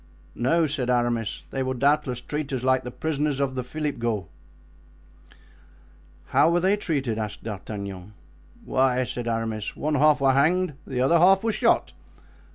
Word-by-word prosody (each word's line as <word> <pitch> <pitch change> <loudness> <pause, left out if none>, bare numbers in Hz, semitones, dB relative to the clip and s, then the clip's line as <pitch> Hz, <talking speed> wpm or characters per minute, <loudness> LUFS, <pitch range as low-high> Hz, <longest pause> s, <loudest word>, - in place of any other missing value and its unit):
"No," 160 +7 +2
said 140 -4 -2
Aramis, 120 -3 0
"they 135 - -2
will 130 0 -1
doubtless 135 -2 +1
treat 150 +2 -4
us 130 -2 -2
like 130 0 +2
the 125 - -5
prisoners 150 0 -2
of 140 -2 0
the 130 -1 -3
Philipghauts." 120 - -3 1.0
"And - - -24 0.9
how - - +4
were 170 +1 +2
they 190 +3 +3
treated?" 140 - -2
asked 105 -1 -5
D'Artagnan. 100 -2 -7 0.5
"Why," 130 -1 +2
said 120 -1 -5
Aramis, 115 -2 -3
"one 155 +1 -2
half 150 +1 +4
were 135 -1 +4
hanged 175 +6 +2 0.2
and 135 - -6
the 125 - +1
other 165 +6 +4
half 190 +3 +5
were 225 - +1
shot." 215 - +2
130 Hz, 165 wpm, -25 LUFS, 120-150 Hz, 1.0 s, half